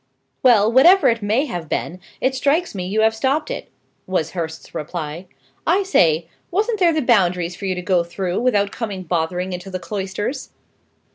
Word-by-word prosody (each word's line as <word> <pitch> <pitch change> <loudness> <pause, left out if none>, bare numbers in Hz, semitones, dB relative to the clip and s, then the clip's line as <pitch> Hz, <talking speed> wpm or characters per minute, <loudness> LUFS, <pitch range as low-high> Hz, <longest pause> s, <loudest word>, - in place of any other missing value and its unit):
"Well, 225 -4 +5
whatever 340 +10 +6
it 230 -1 0
may 220 +8 +1
have 175 - -6
been, 180 - -3 0.2
it 260 - +1
strikes 285 +6 +1
me 180 -3 -4
you 215 +3 +1
have 220 0 +4
stopped 275 - 0
it," - - -6 0.4
was 180 -4 -1
Hurst's 160 -3 -6
reply. 160 +2 -5 0.4
"I 390 +3 +3
say, 165 - +2 0.2
wasn't 430 +4 0
there 350 -3 +5
the 310 -2 0
Boundaries 180 -7 +2
for 195 - -5
you 185 - 0
to 180 - -5
go 180 -2 +2
through, 180 +1 -3
without 205 -5 +1
coming 205 -5 -5
bothering 180 +2 -2
into 180 +2 -6
the 185 - -3
cloisters?" 205 +7 -4
200 Hz, 180 wpm, -20 LUFS, 180-260 Hz, 0.4 s, whatever